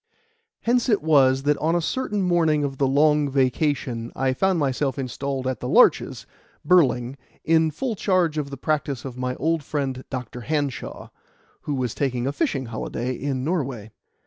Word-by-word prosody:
Hence 245 +2 +1
it 210 -8 +2
was 135 -4 +4
that 145 0 +1
on 165 +2 +1
a - - +3
certain 210 +2 -1
morning 165 -4 +2
of 135 -2 -3
the 135 - +3
long 150 +1 +3
vacation 130 -3 0
I 130 -1 +1
found 190 +6 +1
myself 140 -1 0
installed 135 0 -3
at 130 -3 -2
The - - -4
Larches, - - +3 0.4
Burling, 135 -7 +3 0.2
in 160 0 +3
full 225 - -3
charge 180 -6 +1
of 140 -2 -4
the 140 - -7
practice 140 -3 -2
of 130 -2 -6
my 125 0 -3
old 160 +3 0
friend 135 -3 -3
Dr. 125 -2 -6
Hanshaw, 145 -1 -3 0.6
who 145 - 0
was 125 -3 -2
taking 125 -3 -1
a 135 - 0
fishing 140 -1 -1
holiday 115 +2 -4
in 130 0 -3
Norway. 135 - -2
140 Hz, 170 wpm, -24 LUFS, 130-155 Hz, 0.6 s, was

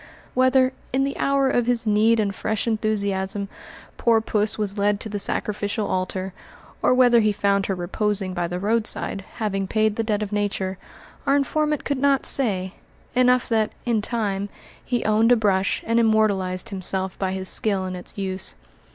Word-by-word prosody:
Whether, 260 0 +3 0.2
in 265 +1 +1
the 275 0 -2
hour 275 -1 +2
of 240 -1 +1
his 240 -1 +1
need 220 +2 +3
and 200 -2 0
fresh 215 +1 -2
enthusiasm, 200 -3 -1 0.5
poor 230 -1 +3
puss 215 -1 0
was 205 -2 -2
led 205 0 +2
to 220 - -5
the 205 0 -3
sacrificial 205 +1 -1
altar, 185 0 -2 0.5
or - - +3
whether 250 -2 +5
he 215 -1 +3
found 200 -1 +1
her 195 - -1
reposing 190 +2 -1
by 175 -1 -1
the 175 +1 -4
roadside, 210 -1 0
having 195 -3 -2
paid 215 +1 +1
the 225 - +1
debt 215 -1 0
of 205 - -6
Nature, 200 -2 -2 0.5
our 275 - +4
informant 300 +1 0
could 285 -2 -2
not 275 0 +2
say; 190 -8 0 0.4
enough 250 0 +3
that, 220 -2 +1
in 230 -3 +1
time, 205 -3 -2 0.3
he 245 -2 -2
owned 220 +2 +3
a - - +8
brush 195 -4 +1
and 230 +1 +2
immortalized 215 -3 +1
himself 190 -1 -3
by 190 -1 -1
his 190 0 -3
skill 195 -2 +1
in 185 0 -4
its 180 +5 -9
use. 190 -1 -4
210 Hz, 175 wpm, -23 LUFS, 195-230 Hz, 0.5 s, a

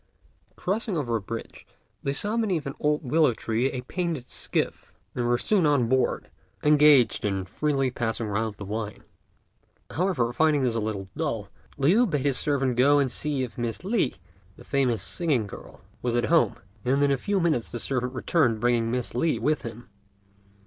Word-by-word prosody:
Crossing 205 0 -2
over 120 -6 -1
a 110 - -1
bridge, 115 +4 -7 0.4
they 140 - -1
saw 205 +10 +1
beneath 195 -10 0
an 140 - -4
old 150 0 +1
willow 150 -2 +3
tree 115 +4 0
a - - -4
little 125 -1 -5
painted 170 -8 -3
skiff, - - -3 0.2
and 120 -1 -1
were 120 0 +3
soon 195 - +2
on 140 -5 +3
board, 130 +2 0 0.3
engaged 150 -4 +5
in 95 -2 -1
freely 135 +5 0
passing 115 -2 -2
round 105 +1 -2
the 100 - -8
wine. 105 +1 -5 0.9
However, 160 -10 0
finding 150 +1 +3
this 125 -2 +1
a 115 - 0
little 105 -3 -3
dull, 115 -11 -3 0.3
Liu 185 - +4
bade 145 -7 -1
his 140 -3 +2
servant 135 -4 0
go 140 +3 +5
and 135 -3 +2
see 145 0 0
if 125 -1 -7
Miss 120 +5 -3
Li, 195 - +1 0.4
the - - -14
famous 125 -8 0
singing 145 - 0
girl, 100 - -11 0.2
was 120 -1 -1
at 120 - +2
home; 165 - +4 0.3
and 135 +3 +2
in 140 - +3
a - - +4
few 200 +9 -1
minutes 160 -10 0
the 120 - -4
servant 125 0 -2
returned 130 -5 +1
bringing 120 -1 +1
Miss 125 0 -2
Li 155 +6 +1
with 150 -4 0
him. 115 -1 -8
130 Hz, 185 wpm, -26 LUFS, 115-150 Hz, 0.9 s, engaged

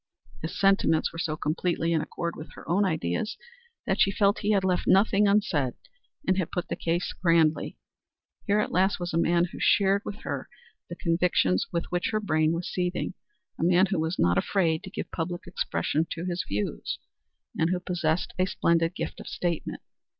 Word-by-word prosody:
His 160 - -5
sentiments 195 -5 +3
were 165 - -6
so 155 -2 -1
completely 170 +2 0
in 160 - +2
accord 170 +2 -4
with 155 - -10
her - - -12
own 195 +4 +2
ideas 160 - -1 0.5
that 195 -1 +1
she - - +5
felt 200 0 +2
he 205 - -1
had 200 -3 +3
left 185 -1 0
nothing 205 +1 +4
unsaid, 185 - +2 0.5
and 185 +1 +3
had 175 - -1
put 180 - -3
the - - -1
case 170 +1 -1
grandly. 165 -3 +2 0.7
Here 205 0 +3
at 210 - -1
last 190 +2 +2
was 175 -1 -4
a - - +1
man 170 +1 +3
who - - -8
shared 200 0 +4
with 205 - -7
her - - -4 0.4
the 175 - -5
convictions 165 - +1
with 170 - -1
which 180 0 0
her 215 - 0
brain 155 -6 +2
was 170 +1 -2
seething 180 0 -2 0.5
a - - -1
man 180 +2 +5
who 190 - +1
was 160 +3 -1
not 85 +1 +3
afraid 165 - +1
to - - -7
give - - -6
public 175 +2 -4
expression 165 -2 -1
to 170 +1 -5
his 175 -1 -2
views, 105 +1 -2 0.6
and 160 - +1
who 180 0 0
possessed 175 -2 -1
a 185 - +3
splendid 170 -1 +1
gift - - -4
of - - -9
statement. 170 -3 -3
175 Hz, 190 wpm, -27 LUFS, 165-190 Hz, 0.7 s, she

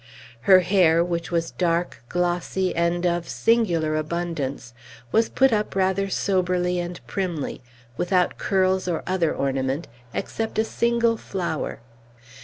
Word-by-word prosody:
Her 185 -1 +9
hair, 175 -3 +4
which 170 -1 -3
was 165 -1 -1
dark, 170 -6 -1
glossy, 180 +1 -1
and 170 +1 +1
of 175 -1 0
singular 175 -10 +2
abundance, 155 -6 -3 0.4
was 225 0 +3
put 265 -2 +3
up 210 -2 -1
rather 190 +1 +1
soberly 180 -2 0
and 175 0 -4
primly 175 -7 -3 0.4
without 180 0 +1
curls, 190 -1 +1
or 170 -3 -1
other 180 -3 +1
ornament, 135 +2 -1 0.2
except 225 - -3
a 220 - +4
single 235 0 +1
flower. 175 - -4
175 Hz, 125 wpm, -24 LUFS, 170-190 Hz, 0.4 s, Her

